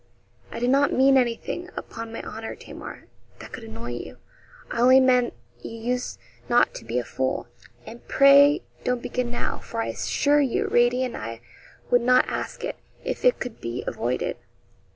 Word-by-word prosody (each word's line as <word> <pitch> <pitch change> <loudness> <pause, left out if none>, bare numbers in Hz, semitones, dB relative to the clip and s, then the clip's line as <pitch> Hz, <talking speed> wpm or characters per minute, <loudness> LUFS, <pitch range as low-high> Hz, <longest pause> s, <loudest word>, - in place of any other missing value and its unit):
'I 230 - -6
did 245 +1 +2
not 280 +1 +4
mean 270 +1 +5
anything, 255 +8 0
upon 225 0 -7
my 230 - -6
honour, 225 +1 -6
Tamar, - - -10 0.3
that - - -11
could - - -8
annoy 115 +2 -7
you. 120 -9 -7 0.5
I 235 - -1
only 255 +2 +7
meant 250 -2 +3 0.2
you 225 - -8
used 245 +2 -2 0.3
not 240 0 +4
to - - -9
be 120 - -2
a 125 - 0
fool, 130 0 -2 0.4
and 235 - -11
pray 280 +4 +6 0.2
don't 250 -1 -1
begin 250 -1 -2
now; 240 - -3
for 230 - -6
I 225 - -1
assure 290 +1 +2
you 265 -4 0
Radie 245 +2 +3
and 250 - -5
I 115 +1 -6 0.5
would 245 - +5
not 250 +1 +4
ask - - -4
it - - -4 0.3
if - - -4
it - - +4
could 245 -3 -6
be 115 +1 -4
avoided. 120 +2 -2
240 Hz, 175 wpm, -25 LUFS, 220-260 Hz, 0.5 s, only